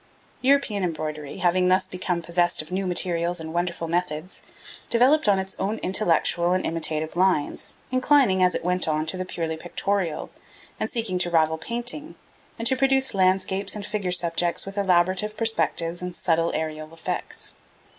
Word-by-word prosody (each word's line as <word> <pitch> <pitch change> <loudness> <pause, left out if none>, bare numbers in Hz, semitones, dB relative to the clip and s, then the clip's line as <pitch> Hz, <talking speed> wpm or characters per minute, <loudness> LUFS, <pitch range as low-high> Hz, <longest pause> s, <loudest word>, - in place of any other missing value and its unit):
European 255 -7 +2
embroidery, 155 -4 -4
having 180 +1 +2
thus 185 +1 +3
become 180 -2 -3
possessed 175 +1 +1
of 155 - -16
new 190 +1 -1
materials 175 -1 0
and 160 0 -6
wonderful 170 -1 -2
methods, 175 0 -2 0.5
developed 255 +2 +4
on 200 - +4
its 190 0 -3
own 210 +3 -1
intellectual 175 -2 +2
and 185 - 0
imitative 160 -1 -2
lines, 180 -5 0 0.2
inclining, 255 -7 +4
as 180 -1 +4
it - - -3
went 180 -1 +1
on, 155 0 0
to 160 - -2
the 185 0 -3
purely 165 -3 -3
pictorial, 175 0 -2 0.5
and - - -1
seeking 225 -7 -2
to 175 - +2
rival 160 -1 +2
painting, 240 - -3 0.4
and 230 0 +2
to 260 - +2
produce 265 -1 +2
landscapes 190 +1 +1
and 205 -2 -5
figure 200 -4 -2
subjects 175 -1 +1
with 195 0 -7
elaborate 190 +2 +2
perspective 175 -7 0
and 180 -1 -5
subtle 165 -1 +1
aerial 155 0 -4
effects. 165 - -4
180 Hz, 160 wpm, -25 LUFS, 165-200 Hz, 0.5 s, developed